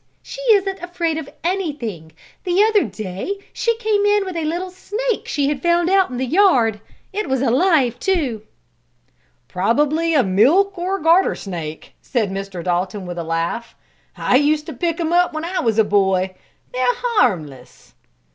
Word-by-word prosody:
She -, -, -8 dB
isn't 390 Hz, -1 st, 0 dB
afraid 340 Hz, -2 st, -2 dB
of 280 Hz, -, -8 dB
anything. 280 Hz, -, -3 dB, 0.3 s
The 370 Hz, +1 st, +3 dB
other 430 Hz, -2 st, +3 dB
day 210 Hz, -, -5 dB, 0.2 s
she 465 Hz, -1 st, 0 dB
came 430 Hz, -3 st, +1 dB
in 410 Hz, -1 st, +3 dB
with 370 Hz, -2 st, -6 dB
a 330 Hz, -2 st, -2 dB
little 350 Hz, +4 st, -3 dB
snake 435 Hz, +5 st, -3 dB
she 285 Hz, -2 st, 0 dB
had 285 Hz, -2 st, -2 dB
found 345 Hz, +1 st, +2 dB
out 385 Hz, -1 st, +4 dB
in 250 Hz, -, -5 dB
the 260 Hz, -, -1 dB
yard. 255 Hz, -, +3 dB, 0.3 s
It 420 Hz, -5 st, -3 dB
was 265 Hz, 0 st, +1 dB
alive, 260 Hz, -2 st, +2 dB
too." 290 Hz, -, 0 dB, 1.1 s
"Probably 295 Hz, -, +1 dB
a 275 Hz, -, +5 dB
milk, 280 Hz, -, +3 dB
or 365 Hz, +3 st, -2 dB
garter, 340 Hz, +2 st, +3 dB
snake," 165 Hz, -5 st, -7 dB
said 220 Hz, -6 st, -1 dB
Mr. 195 Hz, -2 st, -5 dB
Dalton 185 Hz, +2 st, -2 dB
with 175 Hz, -1 st, -6 dB
a -, -, -3 dB
laugh. 165 Hz, +8 st, -3 dB, 0.4 s
"I 255 Hz, -, +3 dB
used 300 Hz, +2 st, +2 dB
to -, -, -7 dB
pick 340 Hz, -1 st, -2 dB
'em 330 Hz, 0 st, -1 dB
up 355 Hz, -1 st, +3 dB
when 310 Hz, +1 st, -4 dB
I 365 Hz, +2 st, -2 dB
was 225 Hz, -2 st, 0 dB
a 220 Hz, -, +6 dB
boy. 190 Hz, -2 st, +1 dB, 0.4 s
They're 250 Hz, -1 st, +1 dB, 0.2 s
harmless." 155 Hz, -, -2 dB
295 Hz, 165 wpm, -20 LUFS, -, 1.1 s, a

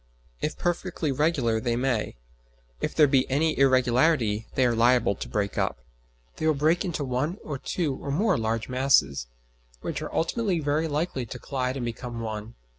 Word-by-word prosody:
If 155 Hz, -, -2 dB
perfectly 175 Hz, -3 st, -1 dB
regular 135 Hz, -6 st, +1 dB
they 115 Hz, +1 st, -1 dB
may; 120 Hz, -3 st, -1 dB, 0.6 s
if -, -, -3 dB
there 155 Hz, -, +7 dB
be 135 Hz, -2 st, +2 dB
any 155 Hz, +4 st, +2 dB
irregularity 125 Hz, -3 st, +3 dB
they 130 Hz, -, +3 dB
are 120 Hz, -, +3 dB
liable 120 Hz, -1 st, +4 dB
to -, -, -7 dB
break 100 Hz, -1 st, -1 dB
up. -, -, 0 dB, 0.6 s
They 155 Hz, -, -1 dB
will 155 Hz, -, +3 dB
break 155 Hz, +6 st, +2 dB
into 170 Hz, -6 st, -2 dB
one 135 Hz, +7 st, -1 dB
or 145 Hz, -4 st, -5 dB
two 160 Hz, -2 st, -1 dB
or -, -, -7 dB
more 190 Hz, +11 st, +2 dB
large 110 Hz, 0 st, -1 dB
masses, 125 Hz, -, +2 dB, 0.5 s
which -, -, -4 dB
are -, -, -5 dB
ultimately 190 Hz, +1 st, 0 dB
very 150 Hz, +2 st, 0 dB
likely 145 Hz, -5 st, -2 dB
to 125 Hz, -, -7 dB
collide 130 Hz, 0 st, -2 dB
and 125 Hz, -, -3 dB
become 120 Hz, 0 st, -5 dB
one. 110 Hz, 0 st, -5 dB
130 Hz, 175 wpm, -26 LUFS, 115-155 Hz, 0.6 s, there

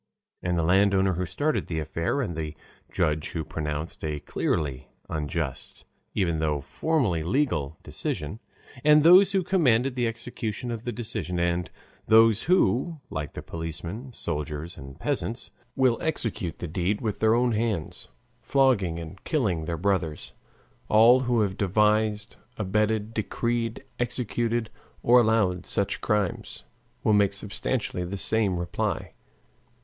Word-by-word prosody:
And 90 Hz, -1 st, 0 dB
the 85 Hz, -, +1 dB
landowner 95 Hz, +2 st, +3 dB
who 90 Hz, +1 st, -2 dB
started 150 Hz, -, -1 dB
the 80 Hz, -, -3 dB
affair, 85 Hz, -, -1 dB
and 85 Hz, -8 st, -4 dB
the 75 Hz, -1 st, -4 dB, 0.4 s
judge 75 Hz, 0 st, 0 dB
who 80 Hz, -, -2 dB
pronounced 75 Hz, +1 st, -4 dB
a 75 Hz, -2 st, -2 dB
clearly 70 Hz, -4 st, -2 dB, 0.2 s
unjust 75 Hz, -2 st, -4 dB, 0.3 s
even 85 Hz, -5 st, +1 dB
though 75 Hz, -2 st, 0 dB
formally 115 Hz, -, 0 dB
legal 85 Hz, -, 0 dB
decision, 75 Hz, +9 st, -3 dB, 0.4 s
and 150 Hz, 0 st, +6 dB
those 185 Hz, +4 st, +7 dB
who 190 Hz, -1 st, +2 dB
commanded 135 Hz, -9 st, +3 dB
the 120 Hz, -2 st, 0 dB
execution 115 Hz, 0 st, -4 dB
of 115 Hz, 0 st, -5 dB
the 120 Hz, -, -1 dB
decision, 110 Hz, -7 st, -3 dB
and 85 Hz, 0 st, 0 dB, 0.4 s
those 110 Hz, -1 st, +6 dB
who, 165 Hz, -3 st, +2 dB
like 75 Hz, -, -4 dB
the -, -, -7 dB
policemen, 85 Hz, -, -6 dB
soldiers, 75 Hz, -, -4 dB
and 70 Hz, +2 st, -11 dB
peasants, 125 Hz, -3 st, -3 dB, 0.2 s
will 130 Hz, -3 st, +2 dB
execute 115 Hz, -, -2 dB
the 85 Hz, -, -5 dB
deed 90 Hz, +5 st, -1 dB
with 110 Hz, -3 st, -3 dB
their 110 Hz, +1 st, +4 dB
own 120 Hz, 0 st, +2 dB
hands, 110 Hz, -7 st, -2 dB, 0.3 s
flogging 115 Hz, -9 st, +2 dB
and 85 Hz, +3 st, -9 dB
killing 100 Hz, -, 0 dB
their 85 Hz, +1 st, -2 dB
brothers, 90 Hz, -4 st, -1 dB, 0.6 s
all 115 Hz, +4 st, +7 dB
who 120 Hz, -3 st, +1 dB
have 95 Hz, -2 st, -1 dB
devised, 105 Hz, +2 st, +1 dB, 0.2 s
abetted, 105 Hz, +2 st, 0 dB
decreed, 115 Hz, +1 st, -2 dB, 0.2 s
executed, 120 Hz, -1 st, -1 dB, 0.3 s
or 125 Hz, +1 st, +7 dB
allowed 105 Hz, -6 st, +2 dB
such 100 Hz, -, -1 dB
crimes, 105 Hz, -5 st, -1 dB, 0.4 s
will 110 Hz, -, +3 dB
make 100 Hz, -1 st, +4 dB
substantially 100 Hz, 0 st, -2 dB
the 95 Hz, +3 st, -4 dB
same 100 Hz, -2 st, +1 dB
reply. 85 Hz, 0 st, -2 dB
105 Hz, 135 wpm, -26 LUFS, 85-120 Hz, 0.6 s, those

